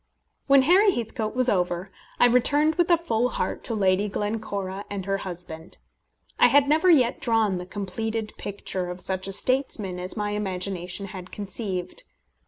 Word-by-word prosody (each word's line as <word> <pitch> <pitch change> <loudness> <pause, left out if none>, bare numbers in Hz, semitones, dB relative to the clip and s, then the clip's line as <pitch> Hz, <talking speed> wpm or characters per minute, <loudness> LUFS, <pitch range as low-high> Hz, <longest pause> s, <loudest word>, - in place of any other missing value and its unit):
When 275 -1 +6
Harry 375 +8 +5
Heathcote 225 -1 -3
was 255 0 +1
over, 180 -2 0 0.3
I - - +7
returned 285 +6 +4
with 345 +2 +1
a 345 - +6
full 250 -7 0
heart - - -3
to 230 - 0
Lady 195 0 +2
Glencora 200 -2 -3
and 200 -2 -5
her 195 0 0
husband. 170 -3 -6 0.6
I - - +7
had 285 0 +4
never 315 +5 +3
yet 255 -8 +4
drawn 220 -5 +1
the 180 - -8
completed 215 +3 -4
picture 190 -2 -4
of 180 +1 -6
such 190 +1 -3
a - - -4
statesman 210 -4 0
as 180 +3 -5
my 210 0 -2
imagination 190 -2 -2
had 185 -2 -9
conceived. 195 -3 -4
205 Hz, 165 wpm, -25 LUFS, 185-245 Hz, 0.6 s, I